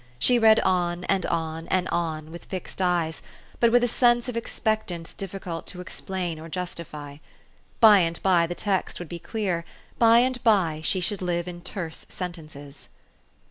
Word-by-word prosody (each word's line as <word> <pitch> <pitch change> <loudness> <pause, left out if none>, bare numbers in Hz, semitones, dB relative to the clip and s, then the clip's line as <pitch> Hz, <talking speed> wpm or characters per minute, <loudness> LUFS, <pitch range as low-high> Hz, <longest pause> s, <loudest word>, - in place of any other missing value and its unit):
She 245 - +4
read 220 -1 +6
on 175 -1 0
and 190 0 0
on 165 0 -3
and 185 -1 +1
on, 160 -2 -2
with 170 - -10
fixed 190 0 -6
eyes, 175 -3 0 0.4
but 235 -1 +4
with 245 +1 +5
a - - +3
sense 240 0 +3
of 250 - -4
ex 230 - -5
pectance 205 -7 -2
difficult 185 -4 -6
to 180 - -5
explain 180 -2 -4
or 165 +1 -9
justify: 155 -5 -6 0.6
by 215 -3 +8
and 165 -2 0
by 175 -3 +4
the 175 - -4
text 195 -1 -1
would 175 -3 -7
be 170 - -6
clear; 185 -3 -2 0.4
by 230 0 +7
and 255 0 -1
by 185 -9 +3
she 185 +3 +1
should 195 +2 -1
live 175 -1 -1
in 175 -1 -7
terse 170 -4 -5
sentences. 155 -6 -8
180 Hz, 175 wpm, -25 LUFS, 165-205 Hz, 0.6 s, by